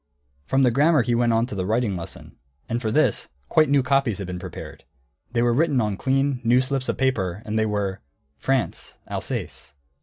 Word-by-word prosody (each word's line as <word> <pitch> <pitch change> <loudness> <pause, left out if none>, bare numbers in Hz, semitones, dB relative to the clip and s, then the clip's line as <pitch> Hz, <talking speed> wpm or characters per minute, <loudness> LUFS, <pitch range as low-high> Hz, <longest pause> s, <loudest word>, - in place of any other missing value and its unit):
From 135 0 +3
the 125 - +4
grammar 145 +2 +4
he 120 0 0
went 120 0 +2
on 115 +1 +2
to 125 - -8
the 95 -2 -2
writing 110 +1 0
lesson. 85 -2 -8 0.3
And 120 +1 -2
for 110 - -1
this, - - +1 0.2
quite 155 -2 +4
new 140 -2 +4
copies 135 -5 +1
had 100 - -4
been 90 0 -5
prepared. 90 -1 -9 0.5
They 120 -1 +1
were 120 0 +3
written 145 0 +2
on 105 -3 0
clean, 135 +2 0
new 120 +2 +4
slips 130 0 -1
of - - -1
paper, 105 -7 0
and 105 - -4
they 110 - +2
were: 100 -2 -2 0.4
France: 135 -3 -1
Alsace. 70 +2 -5
120 Hz, 200 wpm, -24 LUFS, 105-135 Hz, 0.5 s, the